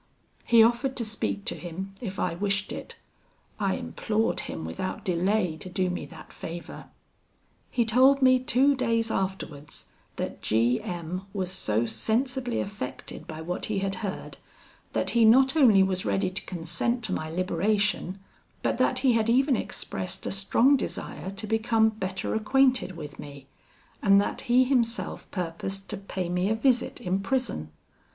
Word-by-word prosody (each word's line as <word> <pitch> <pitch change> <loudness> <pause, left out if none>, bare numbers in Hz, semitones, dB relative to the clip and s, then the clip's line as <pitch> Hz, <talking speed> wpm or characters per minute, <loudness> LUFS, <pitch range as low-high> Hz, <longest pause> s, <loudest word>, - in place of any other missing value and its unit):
He 230 -2 +7
offered 240 +3 +2
to 235 - -2
speak 215 -1 -3
to 235 - +1
him, 185 +3 -6
if 195 -5 -5
I - - 0
wished 195 +2 -1
it. - - -7 0.6
I - - +1
implored 220 0 -1
him 80 - -5
without 85 - -4
delay 180 -1 +1
to 160 - -7
do 185 0 0
me 180 -5 -4
that 155 +2 -13
favour. 170 +1 -8 0.8
"He 235 - +1
told 260 +5 +5
me 255 -1 +5
two 260 +3 +3
days 230 -3 0
afterwards 165 -6 -4 0.3
that - - -4
G 120 +4 +2
M 175 +2 -5
was 185 -3 -2
so 110 - 0
sensibly 245 - -1
affected 200 -10 -6
by 160 0 -7
what 180 +2 -3
he 215 - -2
had 195 0 -1
heard, 200 -3 -5 0.6
that - - +1
he 235 -1 +4
not 265 +5 +6
only 225 -11 +6
was 185 -1 -1
ready 185 -1 0
to 190 - -5
consent 180 +8 -1
to 185 - -1
my 155 -2 -3
liberation, 185 +2 0 0.4
but - - 0
that 255 0 +2
he 255 - +6
had 225 0 +2
even 265 +3 +4
expressed 95 - -4
a - - -2
strong 210 +8 +4
desire 180 - -5
to 200 +3 -6
become 220 +1 +3
better 190 -3 -3
acquainted 250 -4 +2
with 150 -3 -8
me, 140 -2 -9 0.6
and 200 -1 +6
that 200 - -1
he 250 +2 +6
himself 245 -3 0
purposed 190 +2 -4
to 210 - -3
pay 190 -2 -4
me 180 +2 0
a 220 - +2
visit 245 +2 +1
in 185 +1 0
prison. 195 - -2
195 Hz, 160 wpm, -27 LUFS, 180-235 Hz, 0.8 s, He